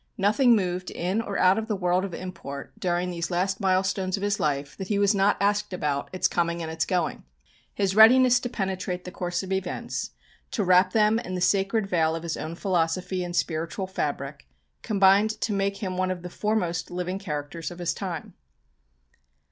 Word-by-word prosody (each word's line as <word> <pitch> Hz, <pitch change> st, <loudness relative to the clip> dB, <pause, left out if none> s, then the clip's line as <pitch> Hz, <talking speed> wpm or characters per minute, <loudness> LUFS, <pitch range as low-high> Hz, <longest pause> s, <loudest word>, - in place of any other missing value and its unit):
Nothing 230 Hz, +5 st, +4 dB
moved 180 Hz, -2 st, -1 dB
in 185 Hz, +6 st, -1 dB
or 205 Hz, -3 st, -4 dB
out 185 Hz, +3 st, +4 dB
of 220 Hz, -, -5 dB
the 215 Hz, -, -1 dB
world 180 Hz, -1 st, +1 dB
of 195 Hz, -, -4 dB
import, 170 Hz, -7 st, -7 dB
during 180 Hz, 0 st, 0 dB
these 170 Hz, -1 st, -3 dB
last 190 Hz, +2 st, 0 dB
milestones 190 Hz, 0 st, +1 dB
of 200 Hz, -, -6 dB
his 205 Hz, 0 st, 0 dB
life, 140 Hz, -1 st, -1 dB
that 190 Hz, -, -5 dB
he 205 Hz, -, 0 dB
was 200 Hz, +1 st, +4 dB
not 200 Hz, +1 st, +3 dB
asked 205 Hz, -1 st, +1 dB
about 145 Hz, -5 st, -2 dB
its 185 Hz, -, +1 dB
coming 170 Hz, 0 st, -1 dB
and 160 Hz, -, -4 dB
its 160 Hz, 0 st, -1 dB
going. 180 Hz, -3 st, -1 dB, 0.5 s
His 195 Hz, -2 st, 0 dB
readiness 245 Hz, +3 st, +7 dB
to 245 Hz, -, -4 dB
penetrate 190 Hz, -4 st, -3 dB
the 180 Hz, -, -7 dB
course 180 Hz, +1 st, -3 dB
of 190 Hz, -, -7 dB
events, 190 Hz, -1 st, -3 dB, 0.4 s
to 215 Hz, -, 0 dB
wrap 185 Hz, 0 st, +4 dB
them 215 Hz, 0 st, +4 dB
in 185 Hz, -5 st, -5 dB
the -, -, -2 dB
sacred 195 Hz, +3 st, +2 dB
veil 165 Hz, -4 st, +1 dB
of 165 Hz, -, -5 dB
his 165 Hz, -1 st, -2 dB
own 160 Hz, +2 st, -5 dB
philosophy 180 Hz, 0 st, -1 dB
and 175 Hz, 0 st, -5 dB
spiritual 165 Hz, +3 st, -1 dB
fabric, 145 Hz, -5 st, -4 dB, 0.3 s
combined 205 Hz, +1 st, +3 dB
to 215 Hz, -, 0 dB
make 200 Hz, 0 st, 0 dB
him 185 Hz, -2 st, -3 dB
one 185 Hz, 0 st, +1 dB
of 180 Hz, -1 st, -4 dB
the 180 Hz, -, -7 dB
foremost 180 Hz, -6 st, -1 dB
living 180 Hz, +2 st, -3 dB
characters 155 Hz, -3 st, -5 dB
of 175 Hz, -, -10 dB
his 175 Hz, -1 st, -1 dB
time. 180 Hz, -5 st, -5 dB
185 Hz, 195 wpm, -26 LUFS, 175-200 Hz, 0.5 s, readiness